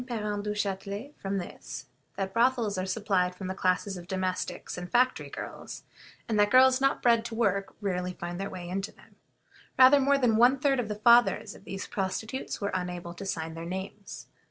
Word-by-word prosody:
Parent 210 -4 -3
Duchatelet 205 +4 -3
from 195 0 -2
this 180 - -4
is, - - -8 0.3
that 195 -1 -3
brothels 235 -3 +2
are 185 0 -2
supplied 190 -3 0
from 190 - -7
the 185 - -2
classes 190 +1 0
of 175 -1 -10
domestics 185 -1 -3
and 180 0 -7
factory 255 +1 +2
girls; - - -8 0.4
and 220 -2 0
that 205 0 +4
girls 260 +1 +6
not 275 0 +1
bred 235 -2 +4
to 230 - -5
work 200 -4 0
rarely 180 -2 -2
find 175 +1 -5
their 195 - -3
way 175 -1 -7
into 195 +3 -3
them. - - -22 0.6
Rather 260 +2 +8
more 280 +1 +3
than 240 -5 +3
one 245 +4 +5
third 270 -1 +2
of 235 - -1
the 210 - -3
fathers 235 -1 +4
of 195 - -16
these 195 -1 -5
prostitutes 220 +5 -3
were 200 -1 -2
unable 180 -2 -4
to 195 +3 -7
sign 160 -3 -3
their 165 0 -7
names. 190 +3 -7
200 Hz, 195 wpm, -28 LUFS, 185-235 Hz, 0.6 s, Rather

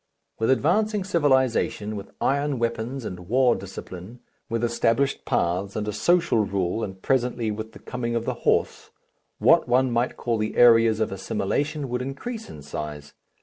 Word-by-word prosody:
With 110 - +1
advancing 205 +10 +2
civilization, 130 - +1
with 100 -1 -7
iron 140 0 0
weapons 115 +2 -2
and 90 -2 -7
war 125 0 +4
discipline, 95 +3 -9 0.3
with 115 0 -1
established 120 +3 +1
paths 90 +4 0
and 105 -1 -2
a 105 - -2
social 165 - +2
rule 100 0 -1
and 95 -2 -6
presently 120 -1 0
with 110 +1 -6
the - - -11
coming 120 -1 -4
of 115 0 -1
the - - -1
horse, - - 0 0.5
what - - +4
one 125 +1 +3
might 120 +1 0
call 115 -2 -1
the 110 0 -2
areas 115 -2 +6
of 110 - 0
assimilation 140 +10 -2
would 125 0 -2
increase 220 - -6
in 75 - -10
size. 75 0 -7
115 Hz, 160 wpm, -24 LUFS, 105-130 Hz, 0.5 s, areas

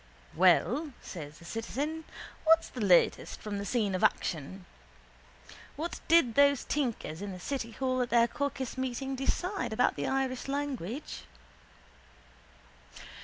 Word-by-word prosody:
—Well, 240 - +3
says 155 -4 -8
the 170 - -15
citizen, 285 - -3 0.4
what's 325 +1 +5
the 250 - -7
latest 185 -4 +3
from 205 -2 -4
the 200 - -4
scene 215 -6 +1
of 185 - -1
action? 180 +4 0 1.1
What 330 +3 -4
did 325 -8 +5
those 280 +1 +4
tinkers 230 - -2
in 200 -1 -5
the 180 - -8
city 230 +1 -4
hall 255 0 0
at 245 - -1
their 235 0 +5
caucus 265 -1 -3
meeting 260 +1 -2
decide 360 - -1
about 245 +3 +2
the - - -2
Irish 265 -1 -1
language? 275 - -4
255 Hz, 130 wpm, -30 LUFS, 205-280 Hz, 1.1 s, what's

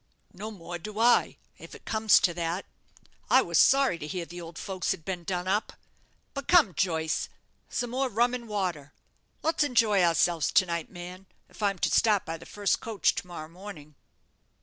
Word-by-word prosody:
"No 215 - -6
more 175 -4 -8
do 210 +5 -8
I, 235 +2 +3 0.2
if - - -11
it - - -15
comes 220 -1 +4
to 175 - +2
that. 170 +2 -3 0.6
I - - +6
was - - +1
sorry 270 -10 +4
to 150 - -6
hear 175 +1 -4
the 175 +1 -9
old 165 -1 -10
folks 190 -2 -4
had 160 - -2
been 180 -2 -4
done 180 +1 -3
up. 205 +3 0 0.6
But 280 -2 -6
come, 330 - +5
Joyce, 160 -3 -1 0.4
some 245 -1 -3
more 260 +1 0
rum 240 +2 +2
and 240 -2 -5
water. 180 -9 -3 0.5
Let's 320 -1 +2
enjoy 225 -8 +3
ourselves 170 -1 +2
to 185 - +5
night, 170 -2 -3
man, 180 +1 -10 0.2
if - - -14
I'm 200 -2 +1
to - - 0
start 210 -4 +3
by 165 0 -4
the - - -13
first 205 -1 0
coach 225 -3 +1
to - - -5
morrow 165 -3 -7
morning. 165 -4 -11
190 Hz, 190 wpm, -28 LUFS, 170-220 Hz, 0.6 s, I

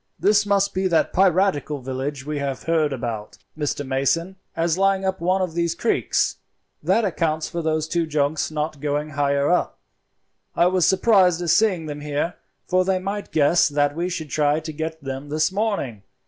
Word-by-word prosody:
This 205 +4 +3
must 200 0 +2
be 190 0 0
that 170 -3 +1
piratical 185 -5 +2
village 130 +1 -4
we 150 -1 -3
have 140 -2 -3
heard 160 -3 +1
about, 115 -5 -5 0.2
Mr. 145 -1 -2
Mason, 140 +8 0 0.2
as 165 0 +1
lying 195 0 +2
up 190 -2 -2
one 185 +2 +1
of 180 -3 -3
these 170 0 0
creeks; 230 - 0 0.4
that 230 - +2
accounts 160 -4 -1
for 170 -1 -4
those 155 -1 -1
two 165 0 -1
junks 150 0 0
not 155 -1 -3
going 150 +1 -2
higher 140 0 +1
up. 180 - 0 0.8
I 170 - +4
was 180 -1 +3
surprised 190 -4 +4
at 170 - +1
seeing 185 -4 +2
them 145 -1 -6
here, 150 +3 -2 0.3
for 185 0 +2
they 190 0 +1
might 200 +2 -4
guess 155 +3 +4
that 145 0 +1
we 175 +2 -2
should 160 -5 -5
try 150 0 +2
to 155 0 -6
get 160 +1 -5
them 135 +1 -6
this 155 +4 +1
morning. 195 - -2
160 Hz, 180 wpm, -22 LUFS, 145-185 Hz, 0.8 s, I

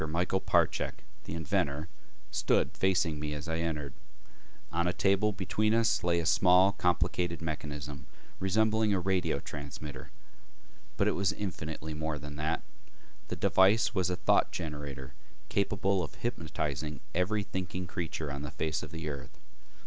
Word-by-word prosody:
Michael 90 +4 +1
Parchak, - - +1 0.2
the - - -4
inventor, 75 -1 0 0.4
stood - - +2
facing 90 -5 +2
me 75 0 -3
as 75 +3 -6
I 80 0 -1
entered. 75 -4 -2 0.8
On 85 +1 +1
a 90 - +1
table 100 +3 +3
between 105 +2 +1
us 115 -1 +3
lay 85 -1 +3
a 85 - -2
small 90 +3 +6
complicated 90 -2 +1
mechanism 75 -3 -5 0.3
resembling 110 +2 +3
a - - +2
radio 95 0 +1
transmitter. 70 -2 -7 0.9
But - - +3
it - - +4
was 95 -2 +1
infinitely 80 -5 -4
more 80 0 -2
than 75 0 -8
that. 80 +1 -1 0.6
The - - -3
device 100 +6 +4
was 95 -4 +1
a 90 - 0
thought 90 - +3
generator 75 -5 -5 0.4
capable 100 -1 +1
of 80 - -5
hypnotizing 75 - -3
every 100 +4 +1
thinking 90 -1 -4
creature 80 -4 -3
on 70 0 -4
the 75 - -4
face 75 +1 -2
of 80 - -7
the 80 -1 -5
earth. 70 -3 -6
85 Hz, 150 wpm, -31 LUFS, 75-95 Hz, 0.9 s, small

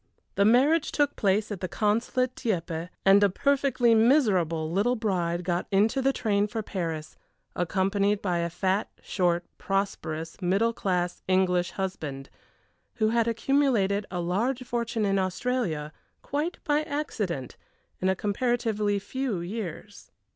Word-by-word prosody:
The 200 - +3
marriage 275 +8 +4
took 290 -1 +1
place 205 +2 +1
at 200 - -4
the 185 - -3
Consulate 230 +5 0
at - - -42
Dieppe, 170 -6 -2 0.2
and 195 +1 +6
a 200 - +5
perfectly 260 +1 +2
miserable 195 - +3
little 210 +8 +2
bride 180 -6 -1
got 175 0 -1
into 215 +7 +2
the 270 +1 +3
train 210 -5 +1
for 220 +1 -4
Paris, 165 -6 -4 0.4
accompanied 195 +3 +1
by 180 -4 -1
a 170 0 -1
fat, 190 +4 0
short, 175 -2 0
prosperous, 165 -4 -3
middle 200 +6 +2
class 180 -4 -1
English 180 -1 +2
husband, 155 -8 -5 0.6
who 220 -2 +2
had 230 0 +2
accumulated 230 -5 +1
a 180 - -3
large 225 +10 -1
fortune 235 -2 -2
in 195 -1 +2
Australia, 185 -5 -2 0.3
quite 305 +5 -2
by 300 -2 +2
accident, 220 - -3 0.4
in 185 - +1
a 190 - +2
comparatively 210 0 0
few 250 0 -3
years. 200 +1 -6
200 Hz, 140 wpm, -27 LUFS, 180-235 Hz, 0.6 s, and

